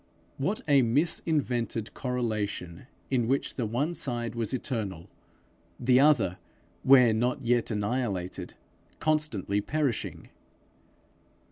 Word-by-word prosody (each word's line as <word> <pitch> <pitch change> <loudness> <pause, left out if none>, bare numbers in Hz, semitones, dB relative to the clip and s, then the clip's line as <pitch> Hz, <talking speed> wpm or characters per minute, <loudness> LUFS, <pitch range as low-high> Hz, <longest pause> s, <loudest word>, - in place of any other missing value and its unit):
What 190 +10 -1
a 140 -2 +5
mis 140 +8 +2
invented 120 -8 -1
correlation 110 -7 -3 0.2
in 120 -4 +1
which 135 +3 0
the 120 -4 -2
one 140 +10 -1
side 120 -7 -2
was 115 -2 -2
eternal, 105 -10 -4 0.7
the 125 +1 +4
other, 140 - +3 0.4
where 125 -4 +6
not 125 +5 0
yet 120 0 +1
annihilated, 105 -4 -2 0.4
constantly 145 - 0
perishing! 140 -1 -2
120 Hz, 105 wpm, -28 LUFS, 110-135 Hz, 0.7 s, where